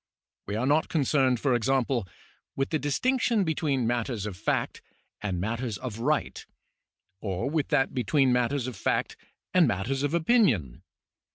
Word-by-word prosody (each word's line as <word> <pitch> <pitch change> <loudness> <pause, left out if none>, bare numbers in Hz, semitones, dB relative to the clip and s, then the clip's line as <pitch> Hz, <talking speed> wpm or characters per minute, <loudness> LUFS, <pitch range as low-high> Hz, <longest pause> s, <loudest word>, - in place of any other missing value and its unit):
We 100 - -3
are 115 +4 0
not 150 +4 +2
concerned, 135 -5 +2
for 135 0 +1
example, 125 -2 +1 0.5
with 135 0 -1
the 155 - +1
distinction 235 - +1
between 150 -6 0
matters 120 -2 -1
of 105 -3 -5
fact 100 - -2 0.4
and 95 -4 -2
matters 115 +2 -2
of 120 -4 -6
rigid, 115 - -1 0.7
or 100 +4 -3
with 150 0 0
that 140 -4 +1
between 130 +1 +2
matters 125 +2 +1
of 130 -2 -5
fact - - -1 0.4
and 180 -4 +5
matters 120 +6 -1
of 145 +3 0
opinion. 160 - +2
130 Hz, 150 wpm, -27 LUFS, 115-145 Hz, 0.7 s, and